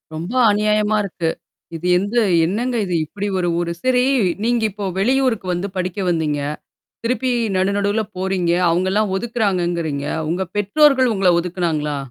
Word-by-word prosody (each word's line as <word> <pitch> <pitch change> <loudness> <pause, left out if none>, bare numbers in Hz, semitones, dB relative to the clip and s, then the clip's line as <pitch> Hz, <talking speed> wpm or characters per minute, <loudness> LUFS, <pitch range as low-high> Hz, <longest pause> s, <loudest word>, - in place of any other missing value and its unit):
ரொம்ப 170 +8 -5 0.2
அநியாயமா 210 +1 +1
இருக்கு. 175 -4 -2 0.5
இது 165 +2 -7
எந்த 200 +5 -2 0.3
என்னங்க 235 +8 -1
இது, 180 - -2
இப்பிடி 205 +6 -5
ஒரு 175 -1 0
ஊரு? 170 0 -2
சரி. 250 -1 +3 0.4
நீங்க 235 0 +1
இப்ப 200 0 -5
வெளியூருக்கு 250 -2 +1
வந்து 180 +3 -2
படிக்க 185 +1 -3
வந்தீங்க. 155 -4 0 0.7
திருப்பி 255 +2 0 0.3
நடு 185 +1 +2
நடுவுல 205 +2 +1
போறீங்க. 185 -2 0 0.2
அவுங்க 180 +3 +1
எல்லாம் 210 -1 +1
ஒதுக்குறாங்கங்கறீங்க. 175 -10 -1 0.2
உங்க 180 +3 -1
பெற்றோர்கள் 260 +4 +4
உங்கள 190 -2 +3
ஒதுக்குனாங்களா? 165 -4 -2
195 Hz, 140 wpm, -20 LUFS, 175-220 Hz, 0.7 s, பெற்றோர்கள்